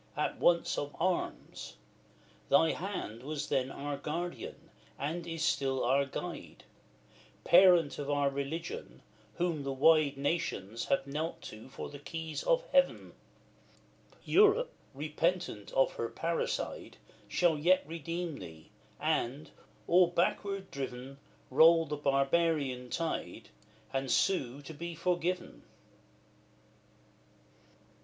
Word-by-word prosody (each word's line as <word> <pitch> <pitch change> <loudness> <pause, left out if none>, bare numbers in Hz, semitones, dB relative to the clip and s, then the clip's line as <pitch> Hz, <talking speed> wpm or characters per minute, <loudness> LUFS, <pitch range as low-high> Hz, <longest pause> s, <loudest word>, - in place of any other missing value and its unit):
as - - 0
once 170 -1 +3
of 145 0 -5
Arms; 180 +1 -2 0.7
thy 160 +3 +5
hand 175 - -5
Was 150 +2 -4
then 135 -2 +1
our 140 +1 -4
Guardian, 170 +5 -5 0.3
and 165 +5 -3
is 165 -1 -3
still 135 -6 +1
our 135 +3 +3
guide; 135 - -7 0.8
Parent 175 -5 +6
of 145 -1 -4
our 145 -1 +2
religion! 140 - -5 0.3
whom 170 -4 -1
the 140 0 -3
wide 145 +1 +4
Nations 140 - -2
have 135 - +1
knelt 150 +4 -3
to 110 +4 -10
for - - -7
the 145 - -10
keys 160 +1 -5
of - - +2
heaven! - - +2 1.1
Europe, 425 +4 +4 0.2
repentant 155 - -1
of 135 - +3
her 115 - -3
parricide, 165 +8 -3 0.3
Shall 170 -4 +2
yet 180 +5 +4
redeem 165 0 -4
thee, 80 -1 -11 0.3
and, 135 +6 -1 0.3
all 180 +1 +5
backward 190 +3 -1
driven, 135 0 -6 0.3
Roll 165 +4 +7
the 150 - -3
barbarian 140 -2 +1
tide, 165 +3 -3 0.4
and 135 0 -1
sue 140 -8 +1
to 160 - -8
be 170 +3 -6
forgiven. 180 +2 -1
155 Hz, 115 wpm, -32 LUFS, 135-170 Hz, 1.1 s, Roll